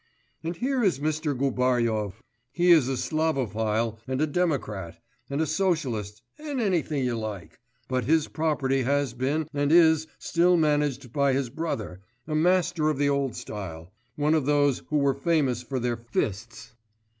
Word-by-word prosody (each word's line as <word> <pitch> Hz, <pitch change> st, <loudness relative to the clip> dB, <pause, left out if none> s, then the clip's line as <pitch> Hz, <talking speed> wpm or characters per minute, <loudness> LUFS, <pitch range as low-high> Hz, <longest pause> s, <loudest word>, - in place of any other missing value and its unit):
And 165 Hz, +2 st, -3 dB
here 255 Hz, +6 st, 0 dB
is 190 Hz, -8 st, +2 dB
Mr. 150 Hz, -1 st, -1 dB
Gubaryov; 120 Hz, -5 st, 0 dB, 0.3 s
he 175 Hz, +4 st, +3 dB
is 155 Hz, -7 st, +6 dB
a 135 Hz, -, -1 dB
Slavophil 115 Hz, -8 st, -1 dB
and 130 Hz, 0 st, -2 dB
a 155 Hz, -, +3 dB
democrat 140 Hz, -, -2 dB, 0.3 s
and 140 Hz, +1 st, -2 dB
a 160 Hz, -, +2 dB
socialist 140 Hz, -, -1 dB, 0.2 s
and 295 Hz, -3 st, -4 dB
anything 170 Hz, -, 0 dB
you 125 Hz, -1 st, 0 dB
like, 110 Hz, -5 st, -6 dB, 0.3 s
but 130 Hz, -1 st, -1 dB
his 160 Hz, +1 st, +2 dB
property 145 Hz, -4 st, 0 dB
has 140 Hz, -1 st, 0 dB
been 140 Hz, +5 st, -1 dB
and 145 Hz, 0 st, 0 dB
is 160 Hz, -2 st, +5 dB
still 175 Hz, +1 st, +2 dB
managed 145 Hz, -5 st, 0 dB
by 140 Hz, -2 st, +2 dB
his 130 Hz, -3 st, -1 dB
brother, 115 Hz, -, -4 dB, 0.3 s
a 155 Hz, -, -3 dB
master 170 Hz, -1 st, +2 dB
of 150 Hz, -, -1 dB
the 145 Hz, 0 st, +2 dB
old 140 Hz, -3 st, 0 dB
style, 90 Hz, -3 st, -7 dB, 0.2 s
one 150 Hz, +1 st, +1 dB
of 155 Hz, -4 st, +1 dB
those 145 Hz, -2 st, +2 dB
who 150 Hz, -, +1 dB
were 140 Hz, -1 st, +3 dB
famous 140 Hz, -4 st, +1 dB
for 130 Hz, +1 st, -4 dB
their 120 Hz, -1 st, -1 dB
fists. 115 Hz, 0 st, -4 dB
140 Hz, 160 wpm, -26 LUFS, 120-160 Hz, 0.3 s, is